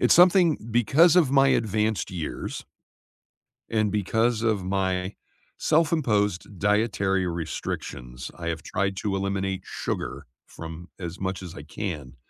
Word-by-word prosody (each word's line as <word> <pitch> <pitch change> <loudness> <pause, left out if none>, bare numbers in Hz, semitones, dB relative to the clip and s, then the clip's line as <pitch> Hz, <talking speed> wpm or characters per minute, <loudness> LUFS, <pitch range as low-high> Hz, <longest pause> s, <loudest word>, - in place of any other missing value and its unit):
it's - - +5
something 175 -2 +6
because 140 - +5
of 160 -7 +5
my 135 0 +5
advanced 110 -2 +1
years 80 -9 -5 1.0
and 110 -2 +1
because 110 +3 +1
of 105 -5 +1
my 95 0 -1 0.4
self-imposed 105 - +1
dietary 100 -2 +1
restrictions, 65 -6 -5
I 85 -1 -4
have 80 -2 -3
tried 95 +4 -1
to 100 -2 -1
eliminate 95 -1 -2
sugar - - -4 0.2
from 80 +2 -9
as 85 -2 -6
much 95 -1 -3
as 90 -2 -8
I 70 - -8
can. 75 -5 -6
100 Hz, 125 wpm, -26 LUFS, 90-115 Hz, 1.0 s, something